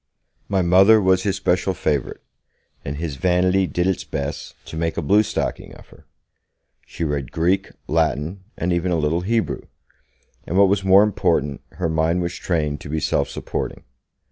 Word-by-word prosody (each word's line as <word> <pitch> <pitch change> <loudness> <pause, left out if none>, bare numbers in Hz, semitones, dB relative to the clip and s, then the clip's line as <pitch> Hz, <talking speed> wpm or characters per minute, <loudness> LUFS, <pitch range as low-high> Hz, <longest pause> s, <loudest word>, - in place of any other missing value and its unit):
My 95 -2 +1
Mother 95 +5 +6
was 95 -2 +3
his 100 0 0
special 95 0 0
favourite, 75 -4 -2 0.6
and 70 - -4
his 75 -3 -4
vanity 90 +2 +2
did 90 0 -1
its 95 -1 0
best 70 +2 -5
to - - -9
make 80 0 -2
a - - 0
bluestocking 105 +7 0
of - - -16
her. - - -19 0.8
She 85 - -5
read 70 -4 -2
Greek, 95 +4 +1 0.2
Latin 80 +3 0
and 90 +1 0
even 85 +1 0
a - - +2
little 80 +2 0
Hebrew, 110 +4 -1 0.9
and, 90 - -1
what 100 -1 +6
was 100 0 +1
more 95 +1 +6
important, 90 -9 0
her 90 - -2
mind 80 +2 +1
was 85 0 -3
trained 75 -6 -2
to - - -9
be 80 +1 -1
self - - 0
supporting. - - -5
90 Hz, 170 wpm, -21 LUFS, 80-95 Hz, 0.9 s, Mother